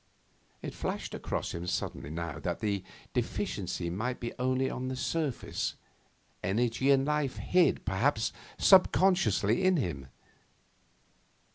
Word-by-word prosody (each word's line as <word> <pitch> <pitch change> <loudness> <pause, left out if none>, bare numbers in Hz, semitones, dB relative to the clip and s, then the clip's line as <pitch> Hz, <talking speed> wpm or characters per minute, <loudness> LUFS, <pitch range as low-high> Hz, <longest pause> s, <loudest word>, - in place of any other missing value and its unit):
It - - -4
flashed - - -4
across - - -3
him 85 +1 -5
suddenly 70 - -3
now 80 0 -4
that - - -2
the 100 -3 -1 0.3
'deficiency' 85 -1 -2
might 120 +7 -2
be 120 - -4
only 130 +1 +1
on 130 -1 -3
the 130 - -2
surface. 145 0 -2 0.7
Energy 120 +7 +1
and 135 -1 +5
life 150 -3 0
hid, 180 -4 +2
perhaps, 95 -2 +1 0.2
subconsciously 180 - +4
in 185 -1 +4
him. 75 - -2
125 Hz, 120 wpm, -30 LUFS, 95-140 Hz, 0.7 s, and